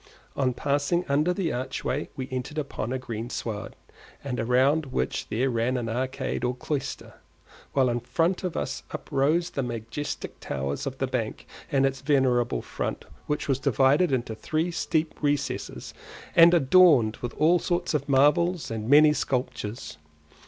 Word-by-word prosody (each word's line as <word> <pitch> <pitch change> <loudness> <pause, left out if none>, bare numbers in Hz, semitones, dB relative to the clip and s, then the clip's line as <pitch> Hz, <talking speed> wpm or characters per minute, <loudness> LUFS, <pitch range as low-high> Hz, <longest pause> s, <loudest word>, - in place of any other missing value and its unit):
On 130 -2 +1
passing 145 +6 0
under 150 +5 +2
the 180 -3 -1
archway 130 +2 -3
we 130 -2 -4
entered 130 +4 -4
upon 140 -5 -3
a 130 - 0
green 120 -2 -5
sward, 110 -4 -5 0.5
round 130 +4 +2
which 130 - -2
there 125 +5 0
ran 120 +2 0
an 120 -2 -3
arcade 130 +2 -2
or 125 0 0
cloister, 140 +2 -4 0.6
while 135 -2 +3
in 120 0 0
front 165 +10 0
of 180 -3 -3
us - - -3
uprose 155 +5 0
the 140 - -2
majestic 120 +4 -5
towers 70 0 -3
of - - -5
the - - 0
bank - - -3 0.3
and 135 -1 +3
its 135 0 -1
venerable 130 -4 +2
front, - - -4 0.2
which 150 - -2
was 135 -2 +1
divided 140 +6 +3
into 120 -3 -1
three 155 +10 -2 0.2
deep 160 -1 0
recesses 145 -1 -2 0.4
and 170 +1 +8
adorned 140 -7 +5
with 120 - -6
all 170 +3 +4
sorts 175 -1 -1
of 145 -1 -1
marbles 150 +4 +3
and 110 0 -4
many 150 +1 +7
sculptures. 125 - -3
135 Hz, 150 wpm, -26 LUFS, 125-155 Hz, 0.6 s, and